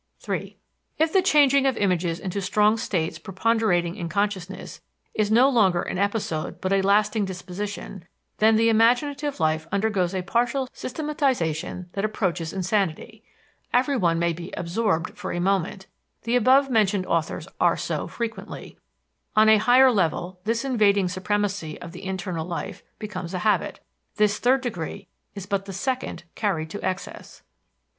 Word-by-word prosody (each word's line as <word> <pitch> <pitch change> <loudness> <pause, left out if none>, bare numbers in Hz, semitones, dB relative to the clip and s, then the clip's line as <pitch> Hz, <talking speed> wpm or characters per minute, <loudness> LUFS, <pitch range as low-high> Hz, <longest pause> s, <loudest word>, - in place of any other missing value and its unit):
(3) - - -4 0.4
If 320 +1 +1
the 380 - +5
changing 280 -6 +4
of 260 -3 0
images 180 -3 0
into 195 +1 -3
strong 210 +3 +3
states 170 -7 -2
preponderating 190 -2 0
in 170 -5 -5
consciousness 195 0 -3 0.3
is 210 -1 0
no 240 +5 +6
longer 195 -10 +3
an 185 - -4
episode 200 -6 -2
but 190 +1 -1
a 195 - +3
lasting 210 +2 +2
disposition, 190 0 -6 0.3
then 220 +1 +5
the 225 +1 +3
imaginative 260 +6 +2
life 155 0 0
undergoes 195 -3 0
a 185 - -2
partial 240 +6 0
systematization 255 - -2
that 195 - -2
approaches 185 -6 -1
insanity. 195 +2 -2 0.5
Everyone 245 - +2
may 170 0 +1
be 170 +2 -8
"absorbed" 175 -1 -1
for - - -5
a 175 - -2
moment; 190 +1 0 0.4
the 230 +2 0
above 260 +3 +5
mentioned 210 -6 +2
authors 165 -3 -1
are - - +3
so - - -3
frequently. 225 -4 -6 0.6
On 215 0 +6
a 220 - +7
higher 250 +4 +6
level 180 -2 -1
this 230 +4 0
invading 205 -7 +3
supremacy 190 -3 -2
of 170 - -9
the 185 +2 -10
internal 185 -3 -3
life 175 - -5 0.2
becomes 190 -4 -6
a - - -1
habit. 215 - +1 0.4
This 210 -1 +2
third 260 +2 +3
degree 200 -11 -5 0.3
is 200 -2 -6
but 200 -1 -2
the 195 - -7
second 255 +1 -3
carried 160 -7 -2
to 205 - -6
excess. 185 0 -5
200 Hz, 150 wpm, -24 LUFS, 180-230 Hz, 0.6 s, a